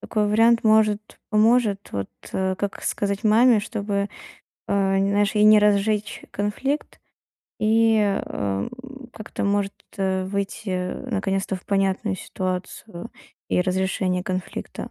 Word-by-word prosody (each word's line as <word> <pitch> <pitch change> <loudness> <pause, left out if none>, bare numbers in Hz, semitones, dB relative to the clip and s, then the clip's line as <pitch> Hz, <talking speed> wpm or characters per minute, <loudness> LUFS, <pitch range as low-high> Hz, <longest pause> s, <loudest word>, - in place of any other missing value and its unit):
такой 210 -1 -1
вариант. 230 +2 +4
Может, 215 -1 +4 0.3
поможет, 215 -2 +3
вот, 100 -1 -3 0.2
как 190 +1 -2
сказать 200 +2 -2
маме, 225 +1 +5
чтобы, 200 -2 -2 0.6
э, 195 -1 +2
нь 195 +1 +1
знаешь, 205 +1 +1
и 210 - +3
не 215 0 +8
разжечь 210 0 +1
конфликт, 230 +9 -3 0.6
и, 225 +1 +4
э, 205 -2 +2
м, 100 - -2 0.4
как-то, 215 -2 -6
может, 200 0 +1 0.2
э, 190 -1 0
выйти, 200 +2 -4
э, 180 +7 -3
наконец-то 195 -2 -1
в 180 - -14
понятную 195 0 0
ситуацию 185 0 -5 0.4
и - - +2
разрешение 185 0 0
конфликта. 185 -1 -5
200 Hz, 125 wpm, -23 LUFS, 190-215 Hz, 0.6 s, не